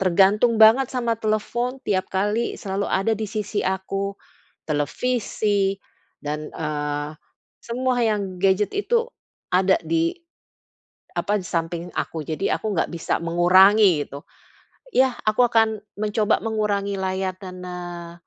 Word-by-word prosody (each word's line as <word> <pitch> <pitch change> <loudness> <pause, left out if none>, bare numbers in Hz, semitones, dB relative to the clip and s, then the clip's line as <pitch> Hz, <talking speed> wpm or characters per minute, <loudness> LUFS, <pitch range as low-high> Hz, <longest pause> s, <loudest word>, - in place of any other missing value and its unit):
tergantung 195 +5 +4
banget 225 +4 +7
sama 235 -3 0
telepon, 225 +4 -2
tiap 190 -2 0
kali 210 +5 0
selalu 200 0 -2
ada 195 +4 +1
di 220 +1 -3
sisi 210 -1 -2
aku, 195 +1 -2 0.5
televisi 200 +4 0 0.4
dan, 150 +1 -4
eee, 150 -1 -3 0.5
semua 250 +1 -1
yang 200 -4 -1
gadget 195 +1 +2
itu 465 +3 +1 0.5
ada 190 +1 +4
di, 330 0 +2 1.1
apa, 205 0 0
di 180 - -9
samping 170 +1 -2
aku. 160 -2 -3
Jadi 160 +6 -3
aku 215 - -1
enggak - - 0
bisa 170 - -1
mengurangi 180 0 +5
gitu. 140 +1 -9 0.7
Yah, 260 -1 +3
aku 215 +3 +3
akan 225 -2 +2 0.2
mencoba 210 0 +1
mengurangi 205 -3 -1
layar 190 0 -2
dan, 185 -2 -9
eee, 175 -1 -7
200 Hz, 125 wpm, -23 LUFS, 180-220 Hz, 1.1 s, banget